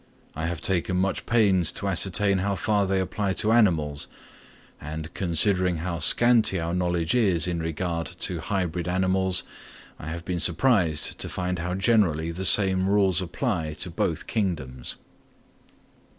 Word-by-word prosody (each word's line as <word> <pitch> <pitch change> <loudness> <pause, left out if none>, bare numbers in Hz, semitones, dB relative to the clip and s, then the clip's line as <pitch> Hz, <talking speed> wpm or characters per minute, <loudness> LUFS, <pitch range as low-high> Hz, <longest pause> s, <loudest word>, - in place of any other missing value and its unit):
I 80 +2 -3
have 85 -1 -4
taken 90 0 0
much 95 +1 -1
pains 95 -7 +3
to 100 - -5
ascertain 95 +1 +1
how 100 +1 -1
far 100 +2 0
they 95 0 0
apply 95 +1 -2
to 105 +3 0
animals, 80 -11 +1 0.7
and, 80 +2 -7
considering 90 0 +1
how 85 +1 -4
scanty 115 +2 +3
our 85 +1 -3
knowledge 85 -2 0
is 95 -10 +2
in 90 -2 -2
regard 85 +1 -3
to - - -1
hybrid 90 -3 -3
animals, 95 0 +1 0.6
I 75 - -9
have 85 +1 -6
been 90 -2 -3
surprised 85 - +1
to - - -2
find 90 -1 -3
how 90 +2 -3
generally 95 -7 +1
the 95 +3 -4
same 95 -1 +6
rules 95 -3 +2
apply 90 - -3
to - - -3
both - - -2
kingdoms. 75 - -3
90 Hz, 150 wpm, -25 LUFS, 85-95 Hz, 0.7 s, same